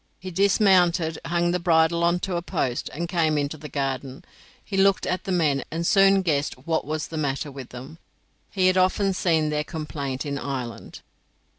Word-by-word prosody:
He 185 0 -7
dismounted, 180 -4 +3
hung 175 +1 +1
the 180 - 0
bridle 170 -1 +3
on 170 +1 +2
to 190 -2 -2
a 170 - -1
post, 135 -9 -2
and 170 +4 -4
came 165 -3 +1
into 145 +1 -1
the 150 0 -10
garden. 135 -1 -4 0.4
He 200 - -5
looked 195 0 +3
at 185 +3 -2
the 195 - -3
men, 155 -6 +1
and 165 +2 -3
soon 195 0 +5
guessed 145 -5 0
what 165 -1 0
was 155 0 -3
the 160 - -5
matter 145 -1 -2
with 135 -2 -9
them; 135 +6 -10 0.5
he 190 -2 0
had 185 0 +4
often 190 +1 +2
seen 160 -4 +1
their 150 0 0
complaint 150 -4 -5
in 140 -1 -3
Ireland. 130 -5 -6
165 Hz, 185 wpm, -24 LUFS, 145-180 Hz, 0.5 s, soon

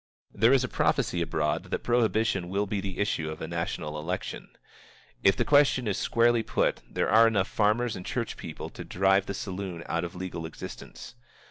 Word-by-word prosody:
There 115 +4 +4
is 135 -2 +4
a - - -1
prophecy 90 -6 +1
abroad 75 -2 -1
that - - -3
prohibition 110 -6 +1
will 100 +2 0
be 100 0 -2
the 95 -2 -5
issue 90 -6 -1
of 80 - -6
a 80 - -5
national 85 -3 -3
election. 90 +4 -4 0.7
If 95 - +5
the - - 0
question 140 -4 +4
is 100 - 0
squarely 120 0 +3
put, - - 0
there - - -1
are 115 +2 +7
enough 100 -4 +1
farmers 110 +2 +1
and 90 - -7
church - - -3
people - - -7
to - - -8
drive 95 +1 +2
the 100 - -3
saloon 95 -3 -5
out 85 +1 -1
of 85 0 -6
legal 90 -3 -5
existence. 80 - -9
95 Hz, 190 wpm, -28 LUFS, 85-110 Hz, 0.7 s, are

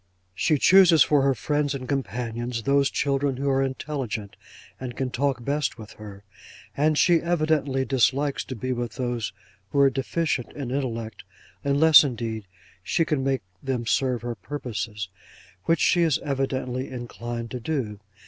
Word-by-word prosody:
'She 150 - +2
chooses 175 -2 +7
for 145 +1 +3
her 135 -1 +2
friends 145 +1 0
and 130 -2 -6
companions, 120 -3 -3
those 140 +1 +3
children 140 -1 0
who 140 +1 -2
are 135 -1 +2
intelligent, 130 -6 -3 0.4
and 125 -2 -6
can 130 -1 -2
talk 130 -2 -1
best 145 -2 -1
with 110 -2 -10
her; 105 -2 -11 0.5
and 150 +1 +2
she 175 +1 +5
evidently 155 -6 +1
dislikes 135 +2 +1
to 130 - -7
be 130 +3 -2
with 120 -2 -4
those 120 -3 -2 0.4
who - - -4
are 140 -1 +6
deficient 135 -1 -1
in 135 -4 -5
intellect, 115 -6 -3 0.4
unless, 145 +3 +7
indeed, 115 -6 -4 0.3
she 165 - +1
can 150 -4 0
make 135 -4 0 0.2
them 130 -3 -2
serve 125 0 +1
her 120 0 -3
purposes, 110 -3 -5 0.6
which 165 - +2
she 175 - +3
is 160 -4 +3
evidently 130 -2 -2
inclined 120 -1 -6
to 125 - -4
do. 115 -6 -3
130 Hz, 155 wpm, -25 LUFS, 120-145 Hz, 0.6 s, chooses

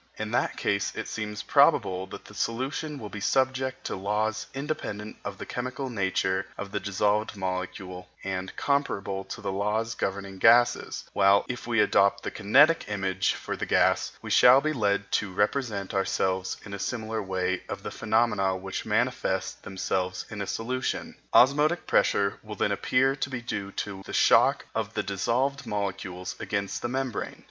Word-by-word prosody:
In - - -4
that - - 0
case 100 -1 0
it - - -4
seems 105 -1 -4
probable 95 0 +3
that - - -11
solutions 135 +5 -2
will 105 - -6
be 105 - -7
subject 130 +3 0
to - - -2
laws 105 +3 -1
independent 120 -7 -4
of 100 -1 -5
the - - -7
chemical 125 +2 -4
nature 95 -3 0
of 100 -1 -6
the 105 - -1
dissolved 105 +2 0
molecule 90 -1 -4
and 95 -1 -4
comparable 100 -9 -1
to 120 - -7
the 100 -2 -2
laws 105 +3 -1
governing 95 -1 -4
gases, 120 +4 +4
while 100 0 +5
if 125 -1 -5
we 115 -2 +1
adopt 100 -1 +3
the - - -3
kinetic 140 +11 +4
image 95 -2 0
for - - -5
the - - -4
gas, - - +3
we - - -5
shall 125 +2 +8
be 155 +2 -1
led 100 -5 0
to 100 -3 0
represent 105 0 -1
to 100 - -1
ourselves 95 -1 0
in 100 - -8
a 100 - -5
similar 110 0 -3
way 95 -1 -1
the - - -5
phenomena 105 -5 +1
which 95 0 -5
manifest - - 0
themselves 95 -1 -2
in 105 -2 -5
a 100 - -3
solution. 125 +3 -3 0.2
Osmotic 150 +6 +4
pressure 100 0 +2
will 105 -1 -8
then 100 - 0
appear 130 +6 +2
to 140 - -3
be 130 -2 -3
due 100 -5 -4
to 100 -2 -4
the - - -7
shock - - +4
of - - -3
the - - 0
dissolved 125 +8 -1
molecules 95 -3 -3
against 100 -1 -2
the - - -1
membrane. 130 -3 -3
105 Hz, 170 wpm, -27 LUFS, 95-120 Hz, 0.2 s, shall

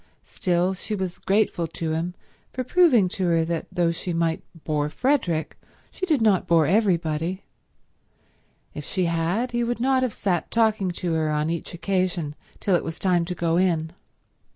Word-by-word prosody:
Still, 180 +1 0
she 210 +3 -4
was 185 -3 -4
grateful 195 -4 +1
to 160 0 -3
him 170 +3 -2 0.4
for 255 - -2
proving 255 - +4
to 185 -1 -1
her 165 -1 +2
that 165 -1 -3
though 170 -1 +1
she 170 +1 -4
might 165 -1 0 0.2
bore 150 -1 0
Frederick 185 - 0 0.3
she 375 - -4
did 295 -9 +2
not 205 -4 +3
bore 165 -2 +4
everybody; 175 -2 +1 1.3
if - - -6
she 185 -2 -1
had, 170 +9 0
he 240 0 0
would 240 0 -2
not 260 +1 +2
have 255 -2 0
sat 180 -4 -1
talking 220 -4 +2
to 175 -1 -2
her 160 -1 +1
on 150 +1 0
each 170 +1 -4
occasion 180 -4 -1 0.3
till 195 - +2
it - - +1
was 165 0 -5
time 180 -3 +2
to 180 +1 -4
go 165 -1 +1
in. 165 -3 +1
180 Hz, 175 wpm, -24 LUFS, 165-210 Hz, 1.3 s, proving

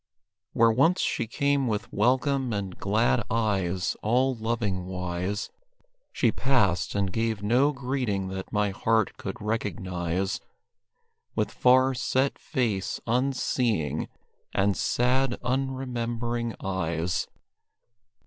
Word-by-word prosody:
Where 115 0 +5
once 140 +10 +3
she - - 0
came 140 +3 +1
with 105 -3 -2
welcome 130 +3 +2
and 100 -3 -3
glad 100 - +2
eyes, 95 -5 0
all 125 +4 +2
loving 110 -5 -2
wise, 90 +3 -3 0.6
She - - +2
passed, 120 -11 +1
and 100 -2 0
gave 115 -2 -1
no 125 +7 +4
greeting 125 -8 -2
that 95 0 -6
my 105 -1 +1
heart 110 +2 +1
could - - -6
recognize, 95 -3 -2 0.9
With - - 0
far, 130 +1 +4
set 130 +2 0
face, 115 - -1
unseeing, 120 - 0 0.5
and 100 0 +3
sad, 125 +5 +1
unremembering 120 -3 -2
eyes. 85 -3 -1
115 Hz, 105 wpm, -27 LUFS, 95-125 Hz, 0.9 s, Where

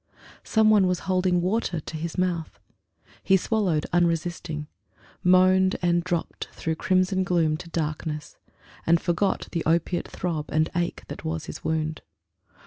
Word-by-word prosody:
Some 220 -1 +4
one 200 -3 +5
was 180 -1 0
holding 185 -1 +1
water 185 -3 0
to 155 - -8
his 165 +2 -4
mouth. 175 -3 -1 0.6
He 190 - +4
swallowed, 185 -6 0
unresisting; 170 -2 0 0.6
moaned 185 +1 +5
and 175 -1 +2
dropped 175 -2 -3
Through 160 -1 -3
crimson 185 +1 +2
gloom 170 -4 +2
to 170 - -10
darkness; 155 -2 -3 0.5
and 170 +1 +5
forgot 185 +3 0
The 170 - -1
opiate 170 +2 +1
throb 160 -4 -3
and 155 0 +1
ache 175 0 -1
that - - -8
was 80 0 -3
his - - -8
wound. 155 0 -1
175 Hz, 140 wpm, -25 LUFS, 160-185 Hz, 0.6 s, one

